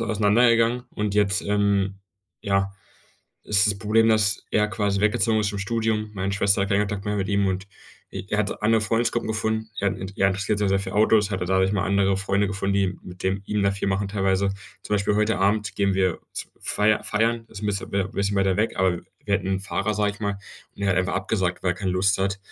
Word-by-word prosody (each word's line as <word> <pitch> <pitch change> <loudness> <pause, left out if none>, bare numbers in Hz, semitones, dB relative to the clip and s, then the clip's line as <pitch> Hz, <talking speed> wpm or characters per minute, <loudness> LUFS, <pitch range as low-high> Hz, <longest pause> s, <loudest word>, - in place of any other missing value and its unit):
auseinandergegangen 115 +3 +3
und 105 -1 -2
jetzt, 100 -2 +2
ähm, 100 -1 +1 0.5
ja, 95 -1 0 0.7
ist 105 0 +3
das 100 -1 0
Problem, 110 +1 +3
dass 105 -3 +2
er 105 0 +2
quasi 100 -2 -1
weggezogen 110 +1 +2
ist 105 - 0
zum 100 -1 -4
Studium. 110 0 -1
Meine 95 0 -2
Schwester 100 0 +2
hat 100 - -1
keinen 100 +1 +3
Kontakt 105 -1 -3
mehr 105 0 -1
mit 95 -1 -2
ihm 100 -1 +2
und 95 +1 -2 0.5
i 95 0 -6
er 105 - 0
hat 105 0 -2
andere 110 +1 +3
Freundesgruppen 115 +1 0
gefunden. 110 0 -2
Er 100 - +2
hat - - -3
'ne 95 - -5
er 95 - +3
interessiert 100 +2 -1
sich 105 - +1
sehr 95 0 +2
für 95 - -5
Autos, 105 -1 +3
hatte 95 -2 -2
dadurch 95 +1 +2
mal 100 -1 0
andere 100 0 +2
Freunde 100 +1 +1
gefunden, 100 0 -2
die 95 -2 0
mit 90 0 -11
dem 95 +1 -1
ihm 105 -1 0
da 100 - +3
viel 100 0 -2
machen 95 +1 -1
teilweise. 95 -1 +1 0.3
Zum 105 - -2
Beispiel 100 0 +1
heute 105 -2 +1
Abend 105 +2 +1
gehen 100 -1 +1
wir 95 -3 +1
z - - -5
feier 105 0 +1
feiern, 115 +2 0
ist 100 - -10
'n 105 - -1
bisschen 100 -1 -2
w 100 -1 +1
bisschen 100 0 -1
weiter 95 -1 +2
weg, 110 - 0
aber, 95 -1 +3
äh, - - -6 0.2
wir - - +1
hätten - - -1
'n 95 0 0
Fahrer, 100 +2 -2
sage 105 0 +1
ich 100 - -15
mal, 100 -2 -2 0.4
und - - -9
er 100 - +1
hat 95 - +1
einfach 90 0 0
abgesagt, 95 -2 -1
weil 90 - +1
er - - -10
keine 95 0 -2
Lust 95 +2 +2
hat. 95 +1 -1
100 Hz, 235 wpm, -24 LUFS, 95-105 Hz, 0.7 s, auseinandergegangen